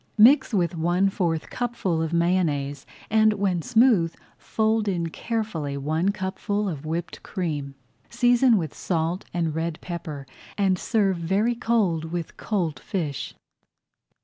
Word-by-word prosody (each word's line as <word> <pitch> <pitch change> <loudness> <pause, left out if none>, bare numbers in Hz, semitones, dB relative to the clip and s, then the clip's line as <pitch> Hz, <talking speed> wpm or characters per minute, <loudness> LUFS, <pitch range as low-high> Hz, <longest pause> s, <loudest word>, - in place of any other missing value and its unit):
Mix 245 +8 +6
with 175 -5 +1
one 175 +4 +2
fourth 165 -5 -1
cupful 210 -9 -1
of 160 -1 -2
Mayonnaise, 160 -5 0 0.2
and 215 0 +5
when 195 -4 0
smooth 225 -7 +3 0.2
fold 220 0 0
in 170 -4 -1
carefully 165 -10 -3
one 155 +6 0
cupful 200 +2 -2
of 155 -4 -5
whipped 170 +2 -4
cream. 150 -7 -4 0.3
Season 245 -1 +4
with 160 -6 -3
salt 170 +1 -2
and 165 -3 -1
red 165 0 -2
pepper 155 -5 -6 0.3
and 190 -3 +2
serve 200 -5 +1
very 195 +8 +1
cold 220 -9 +1
with 170 0 -5
cold 175 -8 -2
fish. 160 -9 -4
175 Hz, 130 wpm, -25 LUFS, 160-210 Hz, 0.3 s, Mix